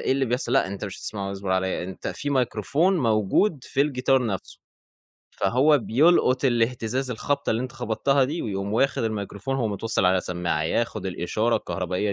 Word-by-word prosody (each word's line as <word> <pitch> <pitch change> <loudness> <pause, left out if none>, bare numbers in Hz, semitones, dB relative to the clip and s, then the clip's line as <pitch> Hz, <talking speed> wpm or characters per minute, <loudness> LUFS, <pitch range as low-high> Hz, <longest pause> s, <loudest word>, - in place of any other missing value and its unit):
اللي - - -6
إيه - - +2
اللي 135 0 +1
بيحصَل، 125 +1 -1
لأ - - +3
أنت 100 +2 -5
مش 100 -2 -6
هتسمَعه، 100 -2 -4
اصبُر 95 -1 -5
عليَّ، 95 -1 0
أنت 95 0 -6
في 145 - -4
مايكروفون 140 - +1
موجود 115 - +1
في 135 - -2
الجيتار 135 -3 +2
نفْسه، 95 -4 -5 0.7
فهو 135 +9 +3
بيلقُط 130 +1 +3
الإهتزاز، 125 +1 0
الخبطة 140 +4 -1
اللي 115 +3 0
أنت 130 - -6
خبَطتها 135 +2 +1
دي، 155 +6 -3
ويقوم 100 -1 -3
واخد 135 +4 +1
المايكروفون، 110 +3 -3
هو 120 -4 0
متوصّل 105 0 -1
على 90 0 +3
سمّاعة، 85 -3 -2
ياخد 110 +5 -1
الإشارة 95 +6 0
الكهربائية 95 +2 -2
115 Hz, 175 wpm, -25 LUFS, 100-135 Hz, 0.7 s, لأ